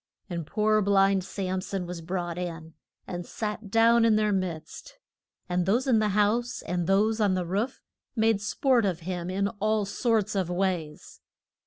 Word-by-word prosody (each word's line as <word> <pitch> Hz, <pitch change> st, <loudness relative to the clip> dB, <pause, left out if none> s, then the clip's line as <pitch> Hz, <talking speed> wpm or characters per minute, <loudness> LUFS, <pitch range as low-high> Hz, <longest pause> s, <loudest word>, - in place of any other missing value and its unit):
And 170 Hz, -3 st, -4 dB
poor 215 Hz, 0 st, +2 dB
blind 195 Hz, -1 st, +3 dB
Sam 185 Hz, 0 st, -3 dB
son 190 Hz, -1 st, -4 dB
was 175 Hz, -1 st, -6 dB
brought 175 Hz, 0 st, -3 dB
in, 165 Hz, -2 st, -6 dB, 0.3 s
and 175 Hz, -1 st, -5 dB
sat 210 Hz, +3 st, -5 dB
down 230 Hz, +2 st, +5 dB
in 225 Hz, -1 st, +4 dB
their 215 Hz, 0 st, +2 dB
midst. 180 Hz, -5 st, -4 dB, 0.5 s
And 180 Hz, 0 st, 0 dB
those 235 Hz, +7 st, +2 dB
in 245 Hz, -5 st, +3 dB
the 215 Hz, -1 st, +1 dB
house 235 Hz, +4 st, +1 dB
and 175 Hz, -1 st, -2 dB
those 215 Hz, +3 st, +2 dB
on 200 Hz, -3 st, +3 dB
the 180 Hz, -1 st, -1 dB
roof 200 Hz, +9 st, -2 dB, 0.3 s
made 220 Hz, -2 st, +2 dB
sport 245 Hz, +3 st, +2 dB
of 180 Hz, -4 st, -1 dB
him 175 Hz, 0 st, -4 dB
in 195 Hz, +2 st, 0 dB
all 215 Hz, 0 st, +1 dB
sorts 210 Hz, 0 st, 0 dB
of 190 Hz, -4 st, -1 dB
ways. 175 Hz, -4 st, -3 dB
195 Hz, 170 wpm, -27 LUFS, 180-215 Hz, 0.5 s, down